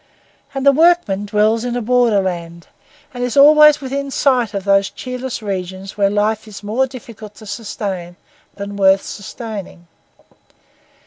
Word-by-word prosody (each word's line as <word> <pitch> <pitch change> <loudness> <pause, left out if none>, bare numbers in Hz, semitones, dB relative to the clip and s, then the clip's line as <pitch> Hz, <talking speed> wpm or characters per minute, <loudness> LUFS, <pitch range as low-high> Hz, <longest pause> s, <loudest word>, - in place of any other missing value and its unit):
And 270 0 -2
the 280 - +8
workman 295 - +2
dwells 215 +2 +1
in 245 -1 -3
a 245 - -1
borderland, 190 -8 0 0.5
and 245 -1 -4
is 245 +2 -2
always 300 +1 +7
within 275 +1 -4
sight 255 -5 +1
of 195 - -3
those 195 0 +2
cheerless 250 -2 -6
regions 190 -1 -5
where 200 -1 +2
life 215 +2 -1
is 210 -1 -10
more 235 +6 0
difficult 230 -5 -11
to 215 - -13
sustain 200 -4 -5 0.4
than 200 0 -7
worth 195 0 +4
sustaining. 205 -4 -8
215 Hz, 140 wpm, -18 LUFS, 195-250 Hz, 0.5 s, the